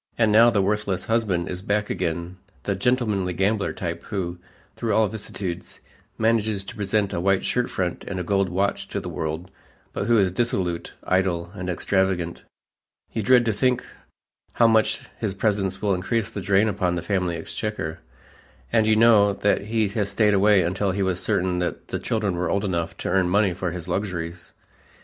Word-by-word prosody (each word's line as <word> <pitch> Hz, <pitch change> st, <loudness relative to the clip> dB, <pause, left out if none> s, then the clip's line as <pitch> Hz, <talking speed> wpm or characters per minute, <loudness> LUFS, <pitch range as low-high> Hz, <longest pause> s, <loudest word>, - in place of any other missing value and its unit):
And 110 Hz, -2 st, +3 dB
now 115 Hz, +3 st, +7 dB
the 100 Hz, -4 st, +2 dB
worthless 100 Hz, -1 st, -1 dB
husband 105 Hz, -7 st, 0 dB
is 90 Hz, 0 st, -4 dB
back 105 Hz, +2 st, -1 dB
again 85 Hz, +1 st, -3 dB, 0.3 s
the 100 Hz, -, -1 dB
"gentlemanly 105 Hz, -4 st, 0 dB
gambler" 100 Hz, +3 st, +1 dB
type 85 Hz, -1 st, -4 dB
who, 90 Hz, -4 st, -4 dB, 0.4 s
through 110 Hz, -3 st, -1 dB
all 110 Hz, -1 st, +4 dB
vicissitudes, 95 Hz, -4 st, -5 dB, 0.4 s
manages 110 Hz, -3 st, +1 dB
to 100 Hz, -, -9 dB
present 105 Hz, -1 st, 0 dB
a 85 Hz, -, -1 dB
white 95 Hz, +1 st, +2 dB
shirtfront 95 Hz, -8 st, -1 dB
and 95 Hz, -2 st, -4 dB
a -, -, -2 dB
gold 100 Hz, +1 st, +1 dB
watch 95 Hz, +3 st, -1 dB
to -, -, -3 dB
the -, -, -7 dB
world, 80 Hz, +3 st, -4 dB, 0.4 s
but 100 Hz, -, -2 dB
who 120 Hz, +1 st, +4 dB
is 95 Hz, -3 st, +3 dB
dissolute, 90 Hz, -5 st, -1 dB
idle 90 Hz, -2 st, 0 dB
and 90 Hz, -3 st, -5 dB
extravagant. 90 Hz, -1 st, 0 dB, 0.7 s
You 110 Hz, -, -1 dB
dread 120 Hz, +3 st, +5 dB
to 110 Hz, -, +1 dB
think 125 Hz, +4 st, +1 dB, 0.7 s
how 120 Hz, -, +4 dB
much 110 Hz, -1 st, +3 dB, 0.2 s
his 105 Hz, -4 st, -2 dB
presence 100 Hz, -2 st, 0 dB
will 100 Hz, -2 st, +2 dB
increase 110 Hz, +4 st, -1 dB
the 100 Hz, -, -5 dB
drain 100 Hz, +3 st, +3 dB
upon 95 Hz, -4 st, 0 dB
the 85 Hz, -, -3 dB
family 90 Hz, -4 st, 0 dB
exchequer, 85 Hz, -1 st, -4 dB, 0.7 s
and 110 Hz, -2 st, +4 dB
you 110 Hz, -, +5 dB
know 110 Hz, -3 st, +5 dB
that 100 Hz, 0 st, +1 dB
he 110 Hz, 0 st, +1 dB, 0.2 s
stayed 105 Hz, +1 st, +2 dB
away 100 Hz, -1 st, +5 dB
until 95 Hz, +4 st, 0 dB
he 95 Hz, +1 st, 0 dB
was 95 Hz, -1 st, 0 dB
certain 90 Hz, -1 st, 0 dB
that 90 Hz, -, -3 dB
the -, -, -2 dB
children 105 Hz, -5 st, -1 dB
were 90 Hz, -, -1 dB
old 100 Hz, +1 st, 0 dB
enough 85 Hz, -4 st, -2 dB
to -, -, 0 dB
earn 95 Hz, -2 st, +2 dB
money 100 Hz, 0 st, +3 dB
for 90 Hz, 0 st, -3 dB
his 85 Hz, 0 st, -6 dB
luxuries. 90 Hz, -3 st, -3 dB
100 Hz, 180 wpm, -24 LUFS, 90-105 Hz, 0.7 s, now